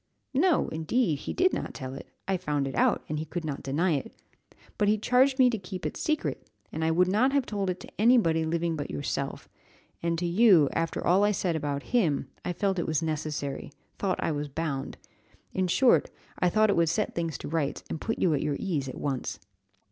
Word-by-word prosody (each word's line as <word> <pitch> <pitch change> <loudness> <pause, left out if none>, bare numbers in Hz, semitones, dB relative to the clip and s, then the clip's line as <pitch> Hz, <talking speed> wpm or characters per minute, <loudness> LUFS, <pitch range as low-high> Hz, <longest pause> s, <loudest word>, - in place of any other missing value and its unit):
"No, 320 +4 +3
indeed, 160 - 0
he - - -5
did 370 +2 +2
not - - -4
tell 130 0 -6
it; 135 - -9 0.2
I 195 - +1
found 150 -6 -1
it 135 - -5
out, - - +2
and 150 0 -2
he 155 - -3
could 170 +1 -5
not 145 -3 -4
deny 160 +7 0
it; 140 -4 -2 0.7
but 205 - +3
he 215 +1 +4
charged 255 +5 +3
me 260 -2 +6
to 225 - -2
keep 185 -1 -7
it - - -2
secret, 310 -1 -2 0.2
and 160 - -3
I 160 - +2
would 180 +3 +3
not 230 +8 +2
have 280 -3 +2
told 200 -3 -2
it 180 0 -2
to - - -8
any 245 +3 +6
body 165 -7 +2
living 165 +1 0
but 145 - -4
yourself; 75 -1 -3 0.5
and 170 0 0
to 175 - -2
you, 175 - +5
after 165 0 -2
all 185 +4 +4
I 205 - +4
said 185 -4 0
about 145 -2 -2
him, 155 - +2
I - - -2
felt 190 +1 0
it - - -2
was 160 0 0
necessary 150 -3 -3 0.3
thought 195 -2 0
I - - +1
was 145 -1 -3
bound 140 -2 -3 0.6
in 185 -1 +1
short, 250 +8 +4 0.3
I 180 - +3
thought 215 +2 +3
it - - +1
would 170 -1 +3
set 170 - 0
things 165 -2 -2
to - - -7
rights, 150 -2 -2
and 160 - -5
put 225 - -2
you 170 - +2
at 145 - 0
your 150 -2 -1
ease 150 -9 -2
at - - -7
once." 135 -3 -3
170 Hz, 225 wpm, -28 LUFS, 150-205 Hz, 0.7 s, me